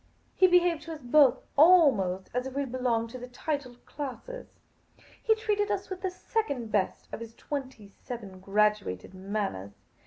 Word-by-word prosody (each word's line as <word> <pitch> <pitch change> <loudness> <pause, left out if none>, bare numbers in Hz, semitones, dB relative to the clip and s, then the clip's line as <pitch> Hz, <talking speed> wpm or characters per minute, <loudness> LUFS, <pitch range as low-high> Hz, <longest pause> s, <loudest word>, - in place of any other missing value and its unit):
He 370 - +6
behaved 355 -2 +3
to 330 - -6
us 305 - -9
both, 260 0 +5 0.2
almost 275 - +5
as 250 +2 -1
if 265 - -8
we 280 0 0
belonged 240 -3 -1
to 255 - -7
the 250 - -8
titled 250 -1 -5
classes. 295 - -7 0.7
He 440 - +3
treated 420 -2 0
us 400 -1 -2
with 370 - -5
the 375 - -1
second 285 - -3
best 200 -3 -1
of - - -4
his 230 0 -9
twenty 260 -8 -6
seven 200 -2 -9
graduated 200 - 0
manners. 190 - -4
255 Hz, 160 wpm, -29 LUFS, 210-330 Hz, 0.7 s, He